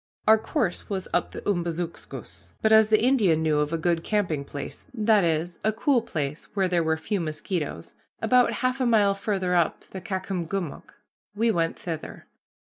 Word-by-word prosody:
Our 220 0 +7
course 220 - -2
was 190 -2 -3
up 175 - +1
the - - -8
Umbazookskus, 160 - -4
but 220 - +4
as 220 -1 +6
the 215 0 +4
Indian 205 -12 +3
knew 155 -2 +2
of 150 +1 0
a 165 - 0
good 165 0 0
camping 180 -9 0
place, 140 0 -7
that 215 -3 +4
is, 165 +1 -1
a 215 - +3
cool 240 +3 +2
place 150 -7 -4
where 195 -2 +2
there 175 -2 +1
were 160 0 +1
few 200 +5 -2
mosquitoes, 155 - -4 0.3
about 250 -1 +4
half 255 +1 0
a 255 - +2
mile 210 -4 +4
farther 195 -2 -1
up 170 -2 +2
the 190 - -9
Caucomgomoc, 185 -2 -4 0.4
we 225 +2 +2
went 165 -4 0
thither. 165 -3 -6
180 Hz, 175 wpm, -26 LUFS, 160-215 Hz, 0.4 s, Our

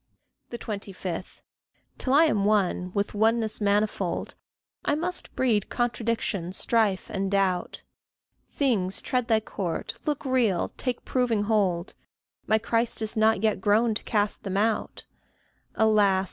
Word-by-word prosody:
25. 195 -6 -6 0.6
Till 260 - -2
I 290 +4 +6
am 210 -10 +1
one, 195 -3 +1
with 200 0 0
oneness 220 +1 +1
manifold, 205 -2 0 0.5
I 290 - +1
must 355 +4 -3
breed 225 -6 +1
contradiction, 230 -6 -1
strife, 210 -2 +1
and 195 0 -1
doubt; 190 -3 0 0.7
Things 210 -10 +1
tread 250 -2 -1
Thy 220 -1 +3
court 185 -4 -4
look 295 -1 -1
real 240 -9 +1
take 250 -2 -3
proving 240 -5 +1
hold 200 -5 0 0.5
My 220 - +4
Christ 230 +1 0
is 220 +2 -4
not 220 -1 +3
yet 215 -3 +1
grown 220 +3 +3
to 215 - -4
cast 205 -1 0
them 195 -1 -3
out; 220 +2 -1 0.7
Alas! 210 -3 +4
215 Hz, 130 wpm, -26 LUFS, 195-230 Hz, 0.7 s, I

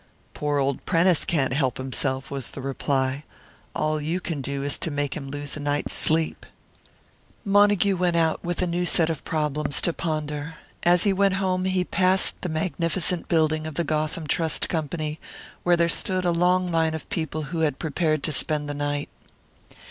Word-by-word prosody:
"Poor 145 -1 -1
old 140 -1 0
Prentice 170 0 +3
can't 135 -6 +1
help 130 -4 +1
himself," 130 +1 -2
was 135 -3 -4
the - - -9
reply. 135 0 -1 0.5
"All 155 0 0
you 165 +5 -1
can 165 -5 -4
do 140 +1 -3
is 145 - 0
to - - -1
make 145 -2 -2
him 135 -3 -6
lose 145 0 -4
a - - -6
night's 145 0 -1
sleep." 160 0 +2 1.0
Montague 205 -1 +4
went 175 -1 +1
out, 165 -1 +1
with 175 +1 -1
a - - +2
new 175 0 -1
set 165 -2 +3
of 160 - -6
problems 150 -2 -1
to 170 - +1
ponder. 155 -1 -3 0.3
As 175 0 +4
he 200 - +3
went 195 0 +2
home, 185 -1 0
he 185 -1 +1
passed 185 +1 +1
the 180 - -3
magnificent 170 +1 0
building 155 -1 +1
of 155 - -7
the 170 - +1
Gotham 155 +1 -1
Trust 160 +1 +1
Company, 155 -1 -3 0.4
where 175 -1 +3
there 170 0 +3
stood 185 +2 +1
a 175 - +3
long 180 +1 +2
line 160 -1 +1
of 160 - -7
people 160 -1 -3
who 165 - -1
had 155 -4 +1
prepared 155 -1 -1
to 155 - 0
spend 150 0 +2
the 145 - -3
night. 145 0 -2
160 Hz, 185 wpm, -25 LUFS, 145-175 Hz, 1.0 s, Montague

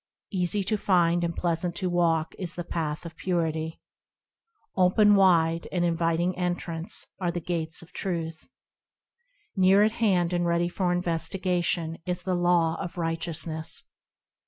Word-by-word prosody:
Easy 190 +1 0
to 215 +3 0
find 175 -3 +3
and 170 -1 -1
pleasant 170 0 -1
to 185 +1 -2
walk: 165 -3 +1
is 180 -4 -3
the 175 - -4
path, 160 -2 -3
of 165 -1 -8
Purity; 160 -3 -2 1.0
Open 195 +3 +5
wide, 170 -4 +4
and 175 -1 +1
inviting 170 +1 +1
entrance, 175 -2 -2
are 180 -2 0
the 175 0 -2
Gates 165 -1 -3
of 175 +2 -18
Truth; 165 0 -4 1.1
Near 190 +1 +5
at 215 - +3
hand 185 -6 +1
and 175 0 +1
ready 170 0 +1
for 180 0 -1
investigation 175 -1 0
is 180 0 -2
the 185 - -1
Law 175 -2 +2
of 175 - -6
Righteousness. 165 -1 -1
175 Hz, 140 wpm, -27 LUFS, 165-180 Hz, 1.1 s, Open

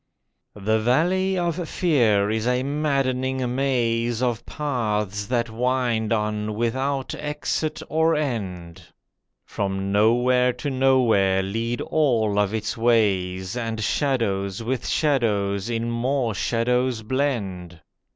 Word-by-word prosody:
The 110 +2 0
Valley 180 +11 +2
of 175 -1 -2
Fear 110 - +2
is 110 +1 -1
a 125 +1 +1
maddening 130 -3 -1
maze 120 -3 0
Of 120 -2 -1
paths 105 -8 -2
that 120 -2 -1
wind 120 -2 0
on 105 -1 -1
without 130 +4 -1
exit 150 +1 -3
or 160 +1 +2
end, 95 - -4 0.6
From 95 -1 -3
nowhere 125 +4 +3
to 145 - -4
nowhere 120 -8 +3
lead 115 +5 -2
all 115 -9 +1
of 100 -1 +1
its 110 -1 -2
ways, 95 -5 +1
And 115 -2 -3
shadows 105 -7 -1
with 125 +2 -2
shadows 105 -8 0
in 115 0 -2
more 120 0 0
shadows 120 +2 0
blend. 100 - -2
115 Hz, 110 wpm, -23 LUFS, 105-130 Hz, 0.6 s, nowhere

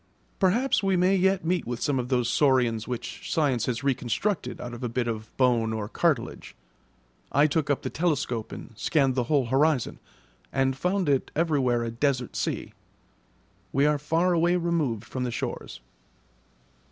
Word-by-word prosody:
Perhaps 225 +9 +2
we 195 -2 +2
may 185 +2 +3
yet 190 -1 +2
meet 175 -3 0
with 120 -1 -3
some 135 0 0
of 125 0 -3
those 125 -3 +1
saurians 125 -5 +2
which 125 -2 -5
science 135 -7 +1
has 120 -1 -2
reconstructed 140 - -1
out 120 0 -6
of 120 - -8
a 120 - -1
bit 120 +1 -1
of 110 -1 -4
bone 120 -4 +3
or 110 -2 -3
cartilage. 145 0 -1 0.8
I 145 +2 +4
took 155 -1 0
up 145 - 0
the - - -3
telescope 145 -9 -1
and - - -9
scanned 135 +1 +2
the 125 -1 0
whole 140 -1 +2
horizon, 135 +1 +1 0.5
and 135 -1 +1
found 180 +4 0
it 140 -2 +1
everywhere 140 -7 +1
a 115 - -3
desert 130 0 -1
sea. - - -3 1.0
We 140 +1 +3
are 150 -1 +2
far 165 +5 +1
away 170 +1 +3
removed 160 - 0
from 130 +1 -4
the 125 - -1
shores. 115 - -5
135 Hz, 165 wpm, -26 LUFS, 120-165 Hz, 1.0 s, I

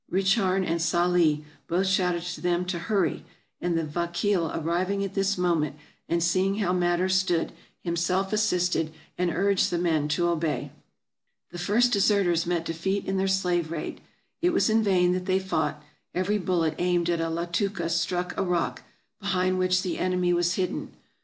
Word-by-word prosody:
Richarn 195 0 +2
and 165 -1 -1
Sali 170 -2 +2 0.2
both 180 +3 +1
shouted 180 -3 +1
to 180 0 -6
them 175 0 0
to 180 -1 -3
" - - -11
hurry 200 -4 +1 0.2
"; - - -46
and 175 -1 0
the 165 - 0
vakeel 170 +3 0
arriving 180 +5 -1
at 195 -1 -4
this 195 0 +1
moment 165 -5 +1 0.3
and 170 0 +1
seeing 185 +3 +2
how 195 -4 0
matters 180 +1 +1
stood, 185 -3 +1 0.3
him 170 -1 -1
self 185 +4 0
assisted, 180 -6 +1 0.2
and 180 0 0
urged 195 +3 +2
the 175 - -1
men 160 -4 +1
to 175 +3 +1
obey. 160 -5 -1 0.8
The 175 - -7
first 235 +7 +2
deserters 195 -5 +2
met 170 -1 0
defeat 190 +5 -2
in 195 - -1
their 190 +1 +1
slave 180 -4 +1
raid. 170 - -5 0.4
It 355 +1 +2
was 295 - +3
in 225 +1 +4
vain 185 -4 +3
that 185 0 -3
they 185 0 +3
fought; 155 -6 -2 0.3
every 195 +4 +1
bullet 170 -4 +1
aimed 175 -1 +1
at 170 -1 +1
a 165 - -1
Latooka 170 +2 -1
struck 175 +2 -1
a - - -1
rock, 180 -3 -1 0.4
behind 185 -2 0
which 185 0 +2
the 180 - -3
enemy 180 -1 +1
was 175 0 +1
hidden. 185 -2 -3
180 Hz, 180 wpm, -26 LUFS, 170-190 Hz, 0.8 s, in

